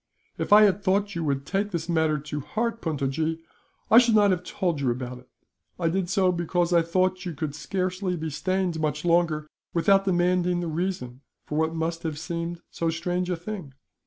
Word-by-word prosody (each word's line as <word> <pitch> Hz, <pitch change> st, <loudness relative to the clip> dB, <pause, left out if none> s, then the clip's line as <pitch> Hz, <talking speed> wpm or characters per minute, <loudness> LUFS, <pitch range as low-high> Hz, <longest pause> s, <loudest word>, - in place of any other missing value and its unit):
"If -, -, -3 dB
I 210 Hz, +1 st, +9 dB
had 200 Hz, -1 st, +3 dB
thought 200 Hz, +1 st, +1 dB
you 170 Hz, -, -3 dB
would 140 Hz, -1 st, -1 dB
take 200 Hz, +4 st, -1 dB
this 170 Hz, -4 st, -3 dB
matter 160 Hz, -3 st, +2 dB
to 150 Hz, +1 st, -5 dB
heart, 230 Hz, -, -2 dB
Puntojee, 155 Hz, +1 st, -1 dB, 0.5 s
I 225 Hz, -, +10 dB
should 235 Hz, -3 st, +4 dB
not 205 Hz, -2 st, +5 dB
have 180 Hz, -2 st, 0 dB
told 175 Hz, -4 st, -2 dB
you 130 Hz, -, +1 dB
about 125 Hz, +1 st, -4 dB
it. 125 Hz, -, -20 dB, 0.5 s
I 165 Hz, -2 st, +1 dB
did 180 Hz, +1 st, -1 dB
so 185 Hz, -1 st, +3 dB
because 175 Hz, 0 st, 0 dB
I 170 Hz, -, +6 dB
thought 185 Hz, +2 st, 0 dB
you 175 Hz, -4 st, -5 dB
could 145 Hz, 0 st, -3 dB
scarcely 185 Hz, +3 st, -2 dB
be 160 Hz, -1 st, -4 dB
stained, 185 Hz, +2 st, -1 dB
much 150 Hz, 0 st, -1 dB
longer, 170 Hz, -3 st, +2 dB, 0.3 s
without 195 Hz, +3 st, +4 dB
demanding 180 Hz, -1 st, +2 dB
the 175 Hz, -, -2 dB
reason 160 Hz, -7 st, -3 dB, 0.2 s
for 150 Hz, -, -5 dB
what 160 Hz, +1 st, 0 dB
must 165 Hz, +1 st, -2 dB
have 160 Hz, -3 st, -3 dB
seemed 170 Hz, +1 st, -4 dB
so 165 Hz, -, -1 dB
strange 175 Hz, +2 st, -2 dB
a 180 Hz, -, +1 dB
thing. 175 Hz, -5 st, -7 dB
170 Hz, 195 wpm, -26 LUFS, 155-185 Hz, 0.5 s, I